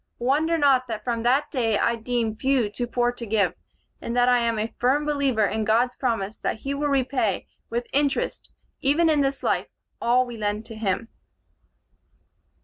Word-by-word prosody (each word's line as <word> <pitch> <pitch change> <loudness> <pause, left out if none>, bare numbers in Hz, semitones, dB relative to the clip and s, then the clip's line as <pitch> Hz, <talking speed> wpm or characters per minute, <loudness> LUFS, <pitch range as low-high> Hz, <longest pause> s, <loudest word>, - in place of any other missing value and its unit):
Wonder 300 +7 +1
not 270 -4 +3
that 220 -2 -5
from 235 -1 -1
that 255 +5 +2
day 225 -6 +1
I 235 - +2
deem 230 -1 -2
few 255 -3 +1
too 240 +3 -3
poor 240 0 +1
to 245 -1 -9
give, 205 -5 +1 0.5
and 235 +1 -3
that 245 0 +4
I 245 0 +5
am 230 -1 0
a 220 +1 -3
firm 275 +5 +2
believer 275 -7 +1
in 220 +2 -1
God's 235 +3 +2
promise 225 -5 -2
that 220 - -3
he 275 - -3
will 290 +1 -1
repay 260 -7 0 0.2
with 235 +1 -2
interest, 285 0 0 0.3
even 315 +4 +3
in 295 -2 +3
this 275 0 -1
life, - - 0 0.3
all 250 +2 +3
we 240 -2 -8
lend 210 +1 -2
to 225 - -10
him." 215 +1 -2
245 Hz, 180 wpm, -24 LUFS, 225-270 Hz, 0.5 s, I